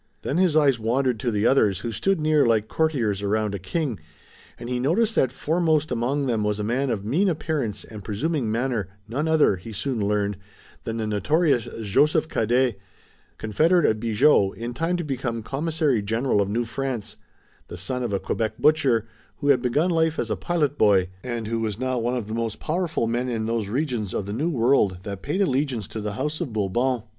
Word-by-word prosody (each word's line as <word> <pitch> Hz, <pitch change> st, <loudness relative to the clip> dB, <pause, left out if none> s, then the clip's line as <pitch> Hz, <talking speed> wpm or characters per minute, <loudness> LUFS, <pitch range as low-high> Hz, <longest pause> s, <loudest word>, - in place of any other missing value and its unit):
Then 145 Hz, -, -1 dB
his 180 Hz, -4 st, +3 dB
eyes 140 Hz, -5 st, +4 dB
wandered 120 Hz, +1 st, 0 dB
to 120 Hz, -, -1 dB
the 105 Hz, -1 st, 0 dB
others 105 Hz, -9 st, +3 dB
who 120 Hz, -, -3 dB
stood 195 Hz, -, 0 dB
near 155 Hz, -1 st, +3 dB
like 110 Hz, -2 st, +2 dB
courtiers 120 Hz, -10 st, 0 dB
around 105 Hz, 0 st, 0 dB
a 100 Hz, -, -3 dB
king, 135 Hz, -, -2 dB, 0.6 s
and 120 Hz, -, -8 dB
he 125 Hz, 0 st, -1 dB
noticed 200 Hz, -, +2 dB
that 130 Hz, -, +2 dB
foremost 155 Hz, +1 st, +1 dB
among 135 Hz, +5 st, 0 dB
them 115 Hz, -4 st, 0 dB
was 105 Hz, 0 st, -1 dB
a -, -, -1 dB
man 130 Hz, +6 st, 0 dB
of 105 Hz, -4 st, -2 dB
mean 170 Hz, -, +2 dB
appearance 145 Hz, -, -2 dB
and 105 Hz, -2 st, -10 dB
presuming 130 Hz, -, -1 dB
manner, 115 Hz, -4 st, -1 dB, 0.2 s
none 140 Hz, +8 st, -2 dB
other, 155 Hz, -11 st, +4 dB
he 100 Hz, +6 st, -10 dB
soon 115 Hz, +4 st, -2 dB
learned, 105 Hz, -1 st, 0 dB, 0.5 s
than 115 Hz, 0 st, -3 dB
the 110 Hz, -, -2 dB
notorious 135 Hz, -, +1 dB, 0.2 s
Joseph 150 Hz, -, +3 dB
Cadet, 120 Hz, 0 st, +1 dB, 0.6 s
confederate 160 Hz, -, +2 dB
of 110 Hz, -, +2 dB
Bigot, 110 Hz, -2 st, +3 dB
in 120 Hz, +1 st, -5 dB
time 165 Hz, +8 st, -1 dB
to 175 Hz, -, -3 dB
become 125 Hz, -6 st, -3 dB
Commissary 150 Hz, -2 st, 0 dB
General 115 Hz, +2 st, +1 dB
of 100 Hz, -, -1 dB
New 115 Hz, +4 st, 0 dB
France, 120 Hz, -2 st, -4 dB, 0.5 s
the -, -, -8 dB
son 125 Hz, +9 st, -2 dB
of 120 Hz, -3 st, -2 dB
a 100 Hz, -, 0 dB
Quebec 110 Hz, +1 st, -2 dB
butcher, 140 Hz, -8 st, +3 dB, 0.3 s
who 145 Hz, -, -2 dB
had 130 Hz, -3 st, +5 dB
begun 145 Hz, +8 st, +1 dB
life 160 Hz, -1 st, +1 dB
as -, -, -2 dB
a -, -, +1 dB
pilot 150 Hz, -5 st, -1 dB
boy, 95 Hz, -3 st, +4 dB
and 120 Hz, -3 st, -4 dB
who 115 Hz, +1 st, -2 dB
was 110 Hz, -3 st, -2 dB
now 130 Hz, 0 st, -1 dB
one 120 Hz, +2 st, -1 dB
of 110 Hz, -4 st, -4 dB
the 110 Hz, -, -5 dB
most 115 Hz, -1 st, -3 dB
powerful 165 Hz, -5 st, -1 dB
men 120 Hz, +2 st, -1 dB
in 115 Hz, -2 st, -2 dB
those 115 Hz, -3 st, -1 dB
regions 120 Hz, -5 st, -2 dB
of 100 Hz, -, -2 dB
the 100 Hz, -, -5 dB
New 150 Hz, +10 st, 0 dB
World 120 Hz, -, +2 dB
that 100 Hz, -2 st, -6 dB
paid 185 Hz, +8 st, 0 dB
allegiance 130 Hz, -, -1 dB
to 110 Hz, -, -5 dB
the 105 Hz, -1 st, -3 dB
House 150 Hz, -, -3 dB
of 150 Hz, -8 st, -3 dB
Bourbon. 110 Hz, +4 st, 0 dB
120 Hz, 205 wpm, -24 LUFS, 110-150 Hz, 0.6 s, had